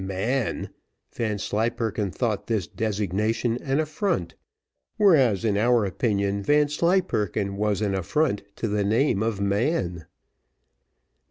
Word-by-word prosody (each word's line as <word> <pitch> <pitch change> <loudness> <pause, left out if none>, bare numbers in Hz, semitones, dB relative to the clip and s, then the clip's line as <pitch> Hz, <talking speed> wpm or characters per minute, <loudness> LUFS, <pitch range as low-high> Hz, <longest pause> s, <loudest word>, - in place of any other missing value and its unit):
Man! 110 +7 -2 0.4
Vanslyperken 110 -1 -1
thought 110 +1 -2
this 110 -6 0
designation 110 +4 -1
an 135 +1 0
affront; 155 - -1 0.6
whereas, 135 - +4
in 105 -2 +2
our 120 -1 +3
opinion, 100 0 0
Vanslyperken 145 - +1
was 105 0 0
an 100 -2 0
affront 105 - 0
to 115 - -2
the 105 -1 0
name 110 +1 +2
of 110 -2 -1
man. 100 - -1
110 Hz, 105 wpm, -25 LUFS, 100-130 Hz, 0.6 s, whereas